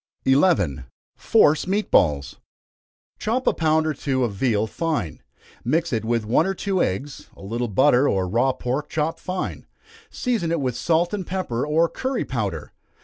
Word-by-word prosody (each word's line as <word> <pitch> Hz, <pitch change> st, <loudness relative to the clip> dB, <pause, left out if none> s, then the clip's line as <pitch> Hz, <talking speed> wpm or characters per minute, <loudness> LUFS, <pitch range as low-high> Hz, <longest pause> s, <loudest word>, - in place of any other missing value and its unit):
11. 135 Hz, -, +2 dB, 0.3 s
Force 155 Hz, +4 st, +3 dB
Meat 205 Hz, +3 st, -1 dB
Balls. 75 Hz, -4 st, +2 dB, 0.8 s
Chop 245 Hz, +4 st, -1 dB
a -, -, +3 dB
pound 160 Hz, -1 st, +2 dB
or 155 Hz, -, 0 dB
two 130 Hz, -2 st, -1 dB
of 115 Hz, -4 st, -1 dB
veal 110 Hz, 0 st, +1 dB
fine 145 Hz, -, -3 dB, 0.4 s
mix 160 Hz, +4 st, 0 dB
it 110 Hz, -2 st, 0 dB
with 115 Hz, -1 st, 0 dB
one 125 Hz, -, +2 dB
or 195 Hz, -, -1 dB
two 190 Hz, -1 st, -1 dB
eggs, 135 Hz, +10 st, -3 dB
a -, -, -14 dB
little 115 Hz, +5 st, -2 dB
butter, 130 Hz, +5 st, +4 dB
or 95 Hz, -1 st, 0 dB
raw 120 Hz, +8 st, +2 dB
pork 130 Hz, +3 st, -3 dB
chopped 160 Hz, +1 st, -2 dB
fine 185 Hz, 0 st, -5 dB, 0.4 s
season 230 Hz, -10 st, -1 dB
it 170 Hz, -, 0 dB
with 130 Hz, -3 st, -2 dB
salt 165 Hz, +8 st, +1 dB
and 195 Hz, -4 st, -3 dB
pepper, 165 Hz, -9 st, -2 dB
or 160 Hz, +3 st, +3 dB
curry 260 Hz, +7 st, -3 dB
powder. 100 Hz, -, -4 dB
140 Hz, 165 wpm, -23 LUFS, 115-170 Hz, 0.8 s, butter